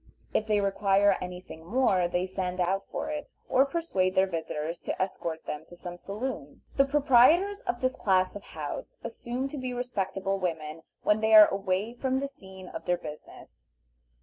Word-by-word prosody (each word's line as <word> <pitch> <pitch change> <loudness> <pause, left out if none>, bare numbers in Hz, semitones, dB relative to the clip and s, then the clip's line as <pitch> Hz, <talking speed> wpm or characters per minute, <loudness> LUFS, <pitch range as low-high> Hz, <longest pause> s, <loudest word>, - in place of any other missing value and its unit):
If 215 - +1
they 210 -1 +2
require 200 0 +3
any 180 0 -5
thing 160 -3 -11
more 195 -3 +2
they 175 +1 0
send 185 -1 -3
out 190 +2 0
for - - -3
it, 295 -1 -5 0.2
or 265 +2 +4
persuade 195 - 0
their 190 - +5
visitors 165 -2 -4
to - - -4
escort 170 -4 -3
them 150 +1 -5
to 175 - -13
some 175 0 -7
saloon. 200 - -6
The 275 - +5
proprietors 295 +8 +5
of 240 - -1
this 255 0 +1
class 185 -1 +2
of 205 - -6
houses - - -7
assume 250 +3 -4
to 290 - -6
be 255 -1 -4
respectable 195 -5 -2
women 160 -3 -3 0.2
when 210 +1 +3
they 220 0 +5
are 215 -1 +10
away 195 +3 -1
from 260 +1 -1
the 280 - -2
scenes 190 -8 -12
of - - -7
their 175 - +2
business. 150 - -11
195 Hz, 180 wpm, -28 LUFS, 180-250 Hz, 0.2 s, are